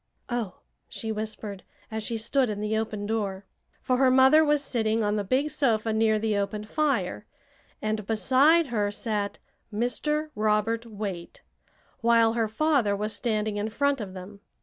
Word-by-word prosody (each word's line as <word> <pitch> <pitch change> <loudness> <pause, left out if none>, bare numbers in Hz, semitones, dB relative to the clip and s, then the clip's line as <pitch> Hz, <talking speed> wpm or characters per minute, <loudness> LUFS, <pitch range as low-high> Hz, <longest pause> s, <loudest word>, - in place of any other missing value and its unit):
"Oh!" 235 -6 -3 0.3
she 225 - -5
whispered, 215 -2 -5 0.3
as 220 0 -3
she 230 +2 -2
stood 250 +3 +1
in 205 -1 -3
the 210 +1 -1
open 215 -2 -2
door. 200 -3 -2 0.4
For 255 - +1
her 265 0 +5
mother 265 +4 +6
was 295 -1 +2
sitting 225 -4 0
on 205 0 +1
the 205 - 0
big 265 +9 0
sofa 225 -7 +1
near 220 0 +3
the 215 0 0
open 200 +1 -2
fire, 295 +6 -1 0.6
and 215 0 -1
beside 270 +8 +4
her 205 -2 +1
sat 205 -1 -3 0.3
Mr. 300 +8 -1
Robert 215 +2 0
Waite, 200 -5 -6 0.6
while 230 -1 +4
her 230 -1 +1
father 240 -3 +2
was 210 +2 -3
standing 215 0 -1
in 210 +1 -2
front 280 +3 0
of 190 -2 -7
them. 190 +2 -9
220 Hz, 160 wpm, -27 LUFS, 210-255 Hz, 0.6 s, mother